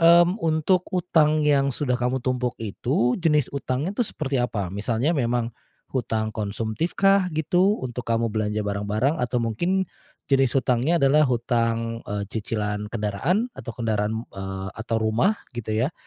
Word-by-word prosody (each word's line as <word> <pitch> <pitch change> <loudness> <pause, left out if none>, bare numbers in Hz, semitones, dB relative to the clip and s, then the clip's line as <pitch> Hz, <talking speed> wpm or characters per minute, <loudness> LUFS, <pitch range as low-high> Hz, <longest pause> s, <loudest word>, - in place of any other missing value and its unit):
mmm, 170 +4 +6
untuk 165 +3 +2
utang 155 -3 +3
yang 140 -2 +3
sudah 140 -4 -1
kamu 125 +2 +1
tumpuk 125 -1 -1
itu, 120 +3 0
jenis 150 -5 +2
utangnya 140 +5 -2
tuh 235 0 0
seperti 135 -4 -2
apa? 100 -7 -2
Misalnya 115 - 0
memang 120 -4 0 0.4
hutang 110 -4 -1
konsumtifkah? 155 - +1
Gitu, 180 +6 +2
untuk 125 -1 -5
kamu 115 0 +1
belanja 105 0 -1
barang-barang 105 +8 0
atau 125 0 -1
mungkin 175 - 0 0.5
jenis 135 -1 +3
hutangnya 130 +6 +2
adalah 140 +1 +5
hutang, 115 -1 0
eee, 100 0 -2
cicilan 105 -2 -2
kendaraan? 115 - 0
Atau 115 - -7
kendaraan 110 0 -1
eee, 95 0 -5
atau 115 +1 -3
rumah? 115 - +2 0.2
Gitu 110 -3 -4
ya, 150 - -2
125 Hz, 140 wpm, -24 LUFS, 110-155 Hz, 0.5 s, mmm